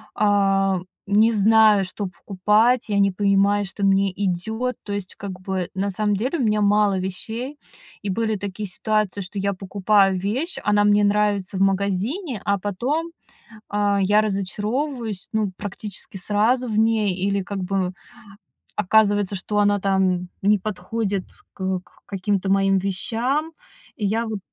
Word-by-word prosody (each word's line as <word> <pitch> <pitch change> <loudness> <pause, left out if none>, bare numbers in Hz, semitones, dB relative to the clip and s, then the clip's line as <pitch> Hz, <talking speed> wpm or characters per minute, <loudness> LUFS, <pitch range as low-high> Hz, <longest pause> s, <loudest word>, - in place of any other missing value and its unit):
а, 195 -2 +2 0.3
не 215 +3 +4
знаю, 215 -1 +5
что 195 +2 -5
покупать, 210 +6 +1
я 200 - +1
не 200 0 +4
понимаю, 200 +1 +2
что 195 +2 -6
мне 195 0 +3
идёт. 220 +6 -2
То 205 - -7
есть 200 -2 -5
как 190 -2 -7
бы 185 -2 -3
на 195 +2 -1
самом 210 +2 0
деле 255 - -1
у 270 - 0
меня 215 -1 +2
мало 205 -1 +3
вещей. 225 +9 -5 0.5
И 205 - -3
были 220 +2 0
такие 205 +1 -5
ситуации, 210 +1 -1
что 195 +2 -6
я 200 +1 0
покупаю 195 0 +2
вещь, 240 - -2
она 205 0 +3
мне 205 0 +4
нравится 205 -2 +1
в - - -1
магазине, 200 - 0
а 200 -1 +1
потом, 245 - -2 0.6
а, 205 -1 +1
я 205 +2 +4
разочаровываюсь, 215 +3 -3
ну, 215 -3 0
практически 205 -1 -6
сразу 215 +7 +1
в 215 -2 -2
ней, 220 -3 +2
или 195 +2 0
как 200 +1 -5
бы 185 -1 -1 0.8
оказывается, 205 0 +3
что 205 +2 -1
она 205 0 +3
там 185 -2 +1
не 210 +2 +4
подходит 200 0 -3 0.3
к 190 -1 -2
к - - -26 0.2
каким-то 195 0 -1
моим 195 0 +3
вещам. 240 - -1 0.5
И 210 - -2
я 225 +3 0
вот 220 -2 -4
205 Hz, 150 wpm, -22 LUFS, 195-215 Hz, 0.8 s, знаю